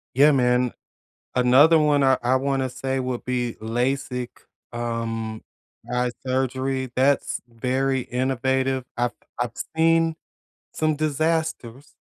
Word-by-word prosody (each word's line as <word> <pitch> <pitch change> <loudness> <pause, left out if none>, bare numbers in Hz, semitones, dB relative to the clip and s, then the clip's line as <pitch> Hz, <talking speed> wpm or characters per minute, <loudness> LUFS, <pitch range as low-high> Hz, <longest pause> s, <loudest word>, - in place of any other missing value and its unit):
Yeah, 145 +3 +6
man. 125 -2 +2 0.6
Another 130 +6 +6
one 145 -2 +3
I 130 -1 +4
I 125 +2 +2
wanna 135 0 0
say 130 +1 -3
would 125 -1 -3
be 125 -2 -1
LASIK, 125 +2 -1 0.4
um, 115 -2 -3 0.5
eye 125 0 0
surgery. 130 0 -1
That's 135 +2 +1
very 130 +3 -1
innovative. 130 +1 -1
I've 120 0 +1 0.3
I've 120 -2 -1 0.2
seen 165 0 +3 0.6
some 155 -1 +1
disasters, 155 -4 -2
130 Hz, 110 wpm, -24 LUFS, 125-140 Hz, 0.6 s, Yeah